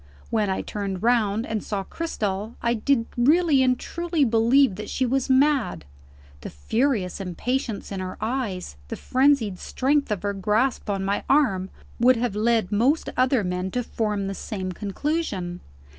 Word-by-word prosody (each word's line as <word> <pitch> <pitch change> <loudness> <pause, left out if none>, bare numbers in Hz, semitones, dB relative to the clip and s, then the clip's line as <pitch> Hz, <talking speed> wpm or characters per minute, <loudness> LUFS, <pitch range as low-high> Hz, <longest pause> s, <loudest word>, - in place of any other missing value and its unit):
When 215 -3 +1
I 190 - -1
turned 195 -2 -4
round, 225 -2 +2
and 220 -2 -3
saw 200 -2 -3
Cristel, 215 - -3
I 235 0 +1
did 235 +1 +1
really 295 +3 +4
and 255 -1 +3
truly 340 -3 -1
believe 235 +2 +4
that 210 +3 -7
she 260 - 0
was 265 +1 0
mad. 260 - +2 0.5
The - - -7
furious 205 - -1
impatience 220 +5 -3
in 195 - -3
her 185 0 -5
eyes, 220 - -3
the - - -4
frenzied 255 -7 +2
strength 280 +1 0
of 205 -2 -2
her 205 0 -1
grasp 210 +5 0
on 195 -1 -1
my 200 +1 -1
arm, 195 -10 +2 0.3
would 250 +2 +5
have 235 -3 -1
led 220 -2 +1
most 250 +10 +2
other 255 -3 +2
men 180 0 -2
to 245 - 0
form 210 -3 -2
the 195 - -3
same 190 -2 -5
conclusion. 200 - -3
225 Hz, 160 wpm, -24 LUFS, 195-260 Hz, 0.5 s, would